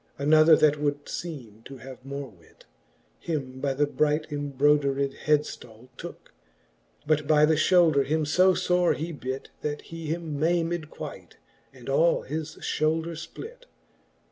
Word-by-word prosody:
Another, 155 +3 +6
that 150 -1 +3
would 145 -1 -1
feeme 125 -11 -7
to 135 - -9
have 130 +1 -11
more 140 +1 -6
wit. 85 -7 -22 0.5
Him 135 -6 -4
by 140 -2 0
the 145 +2 +2
bright 150 +1 0
embrodered 140 -1 +1
hedftall 130 -5 -1
tooke - - -10
j - - -38 0.7
But 150 -1 +1
by 150 -1 +5
the 160 - +3
fhoulder 155 -2 +4
him 155 +2 0
io 185 0 +6
fore 180 -1 +2
he 165 +3 -4
bit. 130 -3 -6
That 150 -1 -3
he 165 -1 -8
him 160 -2 -3
maymed 165 0 0
quite, - - -9 0.3
and - - -15
all - - +3
his 160 0 -5
fhoulder 160 +2 0
fplit. 435 - -9
150 Hz, 145 wpm, -26 LUFS, 140-165 Hz, 0.7 s, Another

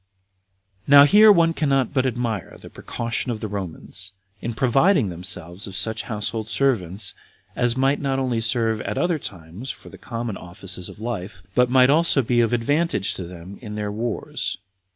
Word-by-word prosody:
1. 140 - +8
Now 140 - +11
here 210 +8 +7
one 165 -4 +4
cannot 135 -5 +1
but 130 -2 +2
admire 120 -6 -3
at - - -16
the - - -12
precaution 115 +2 -3
of 115 -3 -2
the 110 - -4
Romans, 95 0 -7 0.3
in 115 -1 -4
providing 135 - +3
themselves 90 +1 -6
of 95 - -8
such 110 +2 +1
household 110 0 -2
servants, 100 -4 +1 0.4
as 120 0 +1
might 135 +2 +2
not 135 -1 0
only 125 -4 0
serve 115 -1 +1
at - - -4
other 175 -3 +1
times 95 - -8
for - - -8
the - - -13
common 115 -3 -5
offices 90 +1 -3
of - - -12
life, 105 -4 -5
but 125 +2 +3
might 130 +1 +5
also 155 -3 +4
be 120 0 +2
of 115 - +1
advantage 125 - 0
to 90 - -6
them 90 +2 -11
in 105 -3 -7
their 105 -1 -3
wars. 115 +1 -3
115 Hz, 180 wpm, -23 LUFS, 100-135 Hz, 0.4 s, Now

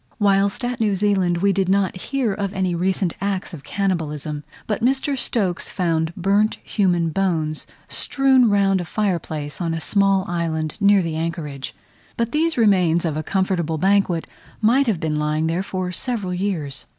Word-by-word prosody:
Whilst 200 +3 +2
at 245 0 -3
New 210 -3 +2
Zealand 190 -3 +1
we 200 -1 +4
did 190 -1 0
not 195 -1 +2
hear 240 +3 -1
of 200 0 -3
any 185 -2 0
recent 185 0 0
acts 195 -1 -2
of 145 -4 -9
cannibalism; 155 -6 -2 0.2
but 210 0 -2
Mr. 270 +3 +1
Stokes 200 -8 -1
found 165 -3 0
burnt 200 +3 +2
human 175 -5 +1
bones 160 -4 -1 0.2
strewed 265 -3 +3
round 195 -2 +3
a - - -5
fire 195 -1 0
place 150 0 -6
on 165 -1 -1
a - - -3
small 195 +1 +2
island 160 -3 -2
near 200 -2 +5
the 165 -2 -3
anchorage; 155 -5 -4 0.4
but 230 0 -1
these 320 0 +1
remains 180 -7 +3
of 160 -3 -1
a 155 - -1
comfortable 175 -2 -1
banquet 190 -1 +2 0.3
might 245 +5 +3
have 205 -7 +1
been 155 -1 -1
lying 150 +1 0
there 165 +3 0
for 185 -1 -3
several 205 -2 -2
years. 180 -7 -3
190 Hz, 170 wpm, -21 LUFS, 165-205 Hz, 0.4 s, near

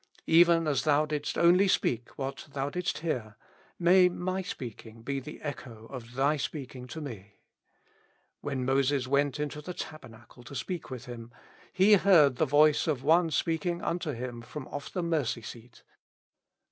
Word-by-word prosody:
Even 165 0 +5
as 140 -4 +1
Thou 150 0 +3
didst 150 -1 -3
only 180 +4 +5
speak 120 -9 0
what 135 0 -5
Thou 140 +1 -2
didst 180 +2 -2
hear, 110 -9 -2 0.4
may 180 +1 +5
my 185 +2 -3
speaking 115 - -8
be 140 +2 -2
the 150 +3 -9
echo 120 -6 -7
of 125 -2 -9
Thy 140 +3 +2
speaking 130 -3 -6
tome. 125 -9 -7 1.2
''When 135 -3 -2
Moses 135 0 +2
went 140 +2 +1
into 150 0 -3
the 180 +3 -7
tabernacle 120 -6 -10
to 140 - -9
speak 180 +3 -4
with 125 -3 -7
Him, 120 -1 -9 0.4
he 195 +3 +5
heard 160 -10 +5
the 160 - +3
voice 150 +3 +4
of 140 -5 -1
One 165 +3 +4
speaking 165 +3 -1
unto 170 -3 -2
him 120 -1 -6
from 130 +3 -8
off 145 0 -6
the 180 - -2
mercy 150 -9 -1
seat." 115 +1 -11
145 Hz, 160 wpm, -29 LUFS, 125-165 Hz, 1.2 s, Even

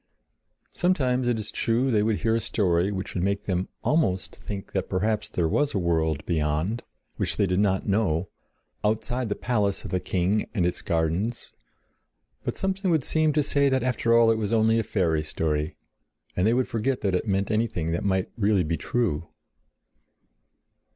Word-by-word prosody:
Sometimes, 130 -8 +1
it 120 -2 +2
is 110 -1 -4
true, 120 +3 +1
they 105 -3 +3
would 110 0 0
hear 115 - +2
a 115 - +2
story 95 -4 +1
which 95 -1 -4
would 90 - -1
make 100 +2 -1
them 90 -1 -1
almost 95 - +1
think 100 -2 -7
that 95 - -2
perhaps 105 +3 0
there 85 -2 0
was 145 - +1
a - - +2
world 80 -4 0
beyond, 80 +7 0 0.4
which - - -1
they 100 - +3
did 90 0 +1
not 95 -2 +1
know, 95 -4 +1 0.6
outside 110 +3 0
the 105 - -1
palace 105 -5 0
of - - -6
the 90 - +1
king 95 +4 0
and 90 -5 +2
its 90 - -1
gardens, 85 +8 -1 0.9
but - - -2
something 195 0 -1
would 160 -5 +2
seem 155 +2 +2
to 150 0 +2
say 140 0 +2
that 130 -2 +1
after 125 -2 0
all 115 -1 +6
it 110 - +1
was 105 -1 -2
only 110 0 +3
a - - +1
fairy 85 -8 +1
story, 75 0 -2 0.6
and 90 +3 +2
they 115 - +4
would 130 0 +1
forget 125 +3 -1
that 100 -2 0
it 90 - 0
meant 100 +1 0
anything 105 -7 0
that 85 - -1
might 95 -2 0
really 100 -4 +2
be 80 +1 -1
true. 90 -3 -1
105 Hz, 185 wpm, -26 LUFS, 90-115 Hz, 0.9 s, all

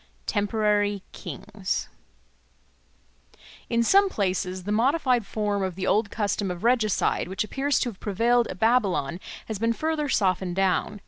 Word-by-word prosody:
Temporary 205 -1 +1
Kings 200 -2 -4 1.8
IN 235 -1 +2
SOME 395 - +5
places 185 - -2
the 205 - -3
modified 250 0 +2
form 205 -2 -1
of 190 -2 -2
the 190 0 -3
old 205 +2 +2
custom 205 -2 -1
of 180 +1 -5
regicide 230 -8 +2
which 190 +4 -2
appears 275 +6 0
to 250 - 0
have 200 - -12
prevailed 230 +4 +2
at 185 - -7
Babylon 195 - +1 0.3
has 220 -3 -5
been 230 +1 +1
further 310 +2 -1
softened 185 -5 +1
down. 195 +2 0
210 Hz, 140 wpm, -25 LUFS, 190-235 Hz, 1.8 s, SOME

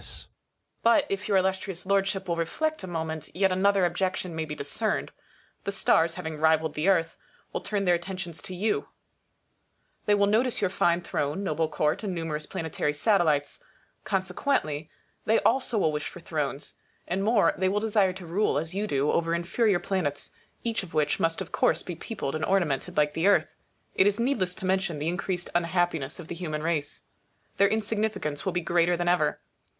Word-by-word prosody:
But, 230 0 +4
if 200 +1 -2
your 200 -2 +3
Illustrious 190 -1 -1
Lordship 195 0 +1
will 170 - 0
reflect 310 - -1
a - - -5
moment, 160 -2 -4
yet 190 +1 +3
another 195 0 +3
objection 185 0 -1
may 160 0 -2
be 150 -1 -5
dis 140 - -5
cerned. 220 -1 0 0.5
The 200 - -2
stars, 165 -4 +3
having 160 -4 -5
rivalled 160 0 +3
the 150 +4 -1
Earth, 165 -4 +3 0.4
will - - -2
turn 205 -2 -1
their 180 - +4
attentions 175 -1 -4
to 185 - -7
you. 210 +4 0 1.2
They 205 - +5
will 200 0 +4
notice 230 +5 +2
your 195 -3 +1
fine 175 -2 +2
throne, 155 +2 -2
noble 160 -3 0
court, 150 -1 0
and 195 -4 -3
numerous 155 -2 -3
planetary 150 -2 -2
satellites. 160 - +2 0.4
Consequently, 180 - -1 0.4
they 220 +1 +4
also 255 -2 +2
will 160 -6 +3
wish 150 -1 -3
for - - -11
thrones. 150 -4 -3 0.3
And 190 +2 -1
more, 210 -5 +4
they 185 0 +1
will 205 +2 +1
desire 210 -3 +2
to 185 -1 -9
rule, 180 +3 +1
as 160 +3 -1
you 205 +2 -1
do, 140 -4 +1
over 170 0 +1
inferior 190 +4 +2
planets, 175 -7 -2 0.3
each 230 -1 0
of 170 -5 -10
which 150 -1 +1
must 165 +2 +1
of 185 - -6
course - - +2
be 180 - -5
peopled 165 -4 -5
and 155 0 -2
ornamented 170 -9 0
like 150 0 +3
the 165 +4 +1
Earth. 205 - +3 0.4
It 190 - +4
is 205 +1 +1
needless 230 -8 +1
to - - -6
mention 190 -3 0
the 150 +3 -1
increased 175 +1 -3
unhappiness 170 -4 0
of 170 - -8
the - - -5
human 155 -3 -4
race. 160 -3 -1 0.6
Their 200 0 +5
insignificance 210 -8 -1
will - - +2
be 175 - 0
greater 170 +1 +2
than 175 0 -2
ever. 175 -4 +2
180 Hz, 185 wpm, -27 LUFS, 160-195 Hz, 1.2 s, They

